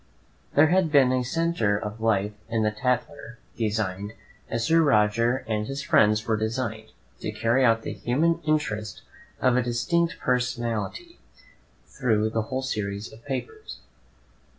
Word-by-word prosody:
There 155 +2 +6
had 180 -2 +2
been 135 -4 +5
a 130 0 +1
centre 130 -7 0
of 105 +1 -6
life 105 -2 +1 0.2
in 115 -1 0
the 105 - +2
"Tatler," 125 +2 -2 0.2
designed, 105 -2 -2 0.4
as 115 0 -1
Sir 165 +4 +4
Roger 115 -2 +2
and 105 -1 -1
his 135 +1 -4
friends 105 -4 +3
were 110 - +1
designed, 110 0 -3 0.3
to - - -4
carry 115 +3 +1 0.2
the - - -4
human 165 +7 +1
interest 110 -9 -2 0.4
of 130 -1 +3
a - - +3
distinct 125 +8 0
personality 125 - -2 0.7
through 110 -4 0
the 110 - 0
whole 130 +5 -3
series 105 -4 -4
of 115 +1 -15
papers. 430 - -6
120 Hz, 140 wpm, -25 LUFS, 110-135 Hz, 0.7 s, There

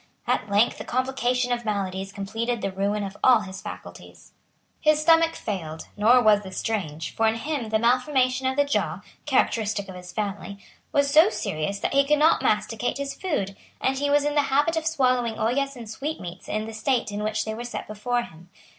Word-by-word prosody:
At 205 - 0
length 205 +4 +2
a - - -4
complication 250 -1 0
of 240 0 -1
maladies 195 -2 -3
completed 225 +4 -3
the 195 - -1
ruin 200 +2 -1
of 195 0 -6
all 250 -4 +6
his 190 -2 -8
faculties. - - -10 0.5
His 305 0 +3
stomach 330 +1 +4
failed; 165 -7 -5
nor 225 +4 +5
was 210 -1 +5
this 190 -2 -9
strange; 160 -8 -3
for 225 - +2
in 220 - +2
him 270 -1 -3
the 220 - +2
malformation 255 +2 +2
of 260 - 0
the 285 +1 +3
jaw, 200 - -1 0.3
characteristic 215 -7 +1
of - - -7
his 180 0 -10
family, 200 -1 -4 0.3
was 285 -1 +2
so 310 +3 +7
serious 200 -3 -3
that - - -1
he 275 0 +5
could 300 +2 +2
not 310 +2 +4
masticate 215 +4 0
his 280 0 -3
food; 205 - -2 0.2
and 265 0 0
he 285 0 0
was 290 0 +3
in 295 - 0
the 290 -1 +2
habit 290 +5 +2
of 320 0 -1
swallowing 255 -7 +1
ollas 275 +5 0
and 235 -3 -9
sweetmeats 215 - -6
in 215 0 -2
the 225 - -7
state 235 +1 0
in 205 +1 -4
which 215 0 -1
they 220 - -3
were 230 +2 -6
set 240 - -5
before 240 +3 -1
him. 175 -5 -14
225 Hz, 200 wpm, -25 LUFS, 205-270 Hz, 0.5 s, so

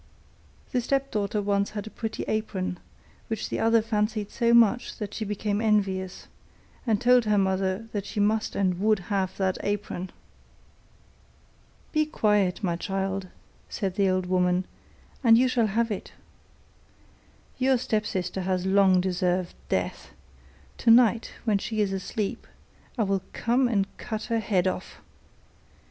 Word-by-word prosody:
The 250 - +1
stepdaughter 230 -6 -1
once 200 0 +1
had 210 -1 -5
a 220 - -9
pretty 225 -1 -4
apron, 195 -4 -2 0.5
which 225 -2 -3
the - - -2
other 225 0 +3
fancied 210 -1 -1
so 235 0 +1
much 235 +1 +4
that 210 -2 -5
she 220 - -3
became 210 0 -2
envious, 195 -4 0 0.6
and 215 -3 +2
told 245 0 +4
her 210 -1 +2
mother 190 +2 0
that 205 -2 -4
she 215 - -4
must 215 +1 +1
and 185 -3 +1
would 215 +2 +3 0.2
have 190 -2 -1
that 190 -1 0
apron. 205 -3 -3 1.8
'Be 310 -1 +2
quiet, 210 -7 +1
my 175 -3 +1
child,' 195 +1 -3 0.4
said 195 -2 -2
the 195 0 +2
old 185 0 0
woman, 180 0 +1 0.6
'and 230 -2 +7
you 255 +2 +4
shall 245 -3 +2
have 225 +3 0
it. 205 - -5 1.5
Your 260 0 +3
stepsister 195 -6 -2
has 185 0 -1
long 190 -1 +4
deserved 180 -1 0 0.2
death; - - -2 0.7
tonight 230 -1 +4
when 210 -3 +2
she 220 +2 -3
is 200 -2 +1
asleep 195 +2 -3 0.5
I 225 - +2
will 195 -1 0
come 245 +2 +2
and 205 -5 +1
cut 220 -2 -4
her 230 - +2
head 190 -4 +1
off. 185 0 -3
205 Hz, 140 wpm, -26 LUFS, 190-225 Hz, 1.8 s, and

